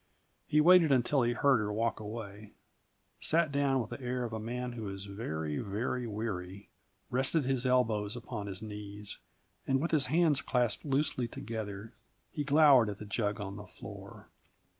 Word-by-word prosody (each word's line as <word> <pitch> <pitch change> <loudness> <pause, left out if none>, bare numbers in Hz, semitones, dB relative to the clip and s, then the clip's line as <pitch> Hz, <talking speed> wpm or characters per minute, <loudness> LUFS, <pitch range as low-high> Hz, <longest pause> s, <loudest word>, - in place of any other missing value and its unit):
He 150 - +4
waited 170 -1 +7
until 135 +1 +3
he 120 0 +2
heard 130 0 +4
her 105 -1 -1
walk 115 +2 0
away, 105 -1 -8 0.7
sat 160 -1 +2
down 140 -1 +2
with 115 - -7
the - - -6
air 125 0 -2
of 115 -2 -4
a 110 - -3
man 125 +3 -4
who 115 -4 -5
is 95 0 -6
very, 80 -8 -4
very 120 +4 -2
weary, 100 -3 -5 0.4
rested 135 +5 +1
his 130 -1 +1
elbows 115 -5 +2
upon 115 -3 -6
his 100 +1 -6
knees, 105 -1 -7 0.5
and 135 0 +3
with 165 +5 -1
his 150 -5 +2
hands 155 -1 +3
clasped 120 -2 0
loosely 135 -3 +1
together, 110 -1 -6 0.4
he 150 - -2
glowered 140 -5 +6
at 100 - -5
the 105 - -8
jug 105 0 -1
on 100 -1 -5
the 105 -1 -9
floor. - - -11
115 Hz, 170 wpm, -32 LUFS, 105-135 Hz, 0.7 s, waited